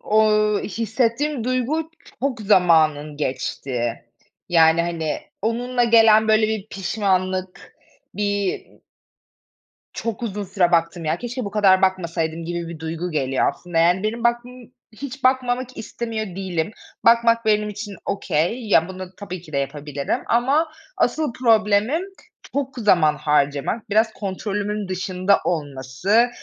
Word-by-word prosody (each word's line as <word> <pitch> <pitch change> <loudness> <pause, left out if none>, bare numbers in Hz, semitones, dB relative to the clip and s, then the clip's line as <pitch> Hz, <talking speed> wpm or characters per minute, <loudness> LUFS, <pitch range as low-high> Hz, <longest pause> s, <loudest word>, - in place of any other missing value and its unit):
o 215 +1 +3 0.4
hissettiğim 230 +5 -1
duygu 255 +6 -1 0.3
çok 260 -3 -1
zamanım 160 -7 +3
geçtiği. 130 -3 -2 0.5
Yani, 165 -1 +5
hani, 165 -2 -2 0.2
onunla 245 +3 0
gelen 220 -1 +5
böyle 215 0 +4
bir 220 -2 -3
pişmanlık, 185 -2 -2 0.4
bir 205 -1 -1 1.3
çok 230 0 -4
uzun 205 -2 -3
süre 185 -2 +1
baktım 170 0 +1
ya, 155 +2 0
keşke 245 +2 -5
bu 200 - -5
kadar 195 -3 +4
bakmasaydım 170 -3 -1
gibi 170 0 -4
bir 165 -2 -8
duygu 165 +2 -4
geliyor 135 -4 +1
aslında. 175 +4 -6
Yani 175 +3 +3
benim 230 +2 -2
bakmam 240 +1 0 0.4
hiç 275 +4 -8
bakmamak 255 -1 +1
istemiyor 225 0 -4
değilim. 185 -2 -2 0.3
Bakmak 230 0 +4
benim 210 -1 +2
için 205 0 -7
okay. 200 +4 -1
Ya, 165 -3 +4
bunu 185 -1 -7
tabii 185 -4 -7
ki 160 - -15
de - - 0
yapabilirim 140 0 -3
ama 275 +7 +2 0.3
asıl 310 -6 0
problemim 225 +4 +2 0.5
çok 275 -1 -2
zaman 175 -9 +3
harcamak. 150 +8 0
Biraz 220 +2 +2
kontrolümün 205 +1 -3
dışında 185 +1 +1
olması, 150 - +1
200 Hz, 125 wpm, -22 LUFS, 170-230 Hz, 1.3 s, Yani